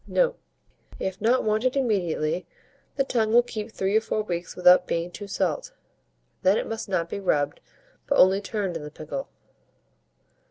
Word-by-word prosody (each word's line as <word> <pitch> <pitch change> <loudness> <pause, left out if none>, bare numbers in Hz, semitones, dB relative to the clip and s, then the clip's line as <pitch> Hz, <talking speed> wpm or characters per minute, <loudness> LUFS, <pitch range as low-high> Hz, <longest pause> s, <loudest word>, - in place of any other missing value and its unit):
Note. - - +1 0.6
If 190 0 -4
not 240 +4 +3
wanted 220 +5 +1
immediately, 180 - 0 0.5
the 275 - +2
tongue 225 -5 0
will 240 +1 +6
keep 220 -2 -6
3 195 -1 -1
or 220 - +5
4 215 -1 -2
weeks 175 -3 -4
without 180 0 +6
being 170 +1 -2
too 205 +2 -8
salt; 185 -6 -2 0.7
then 190 +3 +4
it - - -1
must 225 -2 -5
not 175 -3 0
be 190 - -5
rubbed, 145 -7 0 0.5
but 280 - +2
only 190 +2 +5
turned 200 -4 -3
in 165 - -4
the 150 - -7
pickle. 155 - -6
200 Hz, 165 wpm, -25 LUFS, 175-225 Hz, 0.7 s, will